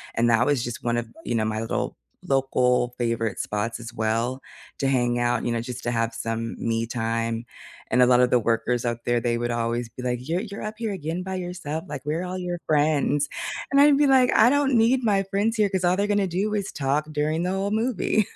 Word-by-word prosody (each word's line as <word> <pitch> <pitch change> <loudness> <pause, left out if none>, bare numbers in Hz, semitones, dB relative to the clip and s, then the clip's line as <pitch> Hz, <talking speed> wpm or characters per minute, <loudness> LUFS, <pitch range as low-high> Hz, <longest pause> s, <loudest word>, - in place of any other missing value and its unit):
And 120 +1 +2
that 115 +2 +4
was 140 -5 +1
just 120 -1 -5
one 120 -1 0
of, 120 -1 -2 0.2
you 120 - -1
know, 110 - +1
my 110 0 -1
little 115 - -3 0.3
local 125 -2 +2
favorite 115 -3 -1
spots 115 +3 -2
as 120 0 -8
well, 115 +4 -1 0.4
to 135 - +1
hang 120 -2 +1
out, 120 -1 0
you 120 - 0
know, 115 -1 -1
just 125 +1 -7
to 120 - -1
have 115 0 0
some 115 0 -3
me 115 0 -1
time, 115 0 -2 0.5
and 125 - +4
a - - +8
lotta 125 0 +5
the 125 0 +3
workers 115 +2 0
out 120 0 -1
there, 120 0 +2
they 120 0 0
would 120 0 -2
always 115 0 -1
be 125 - -10
like, 125 +1 -3
"You're 175 +4 0
you're 205 -2 -7
up 215 +1 -4
here 225 -3 -2
again 170 -1 -3
by 190 0 -4
yourself?" 175 -3 -4
Like, 145 -2 -6
"Where 155 +4 -2
are - - -4
all 185 +1 -4
your 175 -1 -3
friends?" 150 -1 +2 0.4
And 275 - +4
I'd 290 0 +7
be 290 -1 +4
like, 260 -2 +5
"I 225 +3 +7
don't 280 -1 +2
need 240 +3 +3
my 200 -3 +3
friends 200 +4 0
here 210 -2 +3
'cause 190 -2 -1
all 180 +1 +3
they're 200 +1 0
gonna 205 -1 +2
do 195 +5 -1
is 200 -2 -2
talk 145 +2 0
during 155 +3 0
the 180 - 0
whole 195 +1 -1
movie," 220 -2 +1
135 Hz, 235 wpm, -25 LUFS, 120-190 Hz, 0.5 s, a